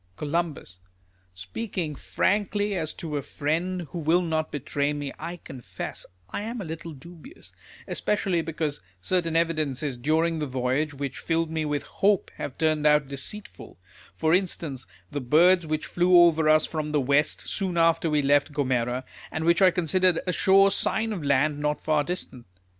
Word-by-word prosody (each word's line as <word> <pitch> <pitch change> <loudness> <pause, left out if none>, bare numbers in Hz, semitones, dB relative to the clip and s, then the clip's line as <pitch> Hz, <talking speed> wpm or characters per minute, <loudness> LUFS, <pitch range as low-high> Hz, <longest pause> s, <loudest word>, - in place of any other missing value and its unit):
Col. 160 - -1 0.8
Speaking 155 - -4
frankly 205 +6 0
as 160 -4 -2
to 155 -3 -4
a - - -2
friend 165 +6 -2
who 175 - -4
will 165 +3 +2
not 160 -2 -1
betray 145 0 -1
me, 145 -2 -5
I 170 +3 -5
confess 130 -7 -7 0.2
I 145 - -4
am 230 +3 -5
a 195 - -5
little 165 0 -7
dubious; 170 - -13 0.4
especially 190 -4 0
because 155 -2 -3 0.2
certain 165 - 0
evidences 155 -5 0
during 160 +5 +1
the 150 - -2
voyage, 130 +4 -1
which 140 -2 -5
filled 165 -1 -1
me 160 -1 -1
with 145 -1 -2
liope, 200 -1 +1
have 135 - -6
turned 155 -1 +2
out 150 -2 +3
deceitful; 170 +10 -7 0.4
for 160 0 +1
instance, 165 -8 -1 0.2
the 145 - -3
birds 170 +6 +4
which 155 0 -2
fiew 180 +1 +4
over 160 -2 +3
us 155 0 +5
from 155 -2 -4
the 150 - +3
west, 140 +3 +2
soon 185 -4 -2
after 165 0 +3
we 150 -1 +1
left 145 +2 +3
Gomera, 130 -3 -1 0.3
and 160 0 -3
which 170 +3 +3
I 190 - +8
considerered 180 0 +2
a 180 - 0
sure 195 +2 +5
sign 220 +3 0
of 180 -7 -5
land 145 +1 +2
not 150 0 -1
far 155 -1 +1
distant. 135 - -5
155 Hz, 165 wpm, -26 LUFS, 145-175 Hz, 0.8 s, I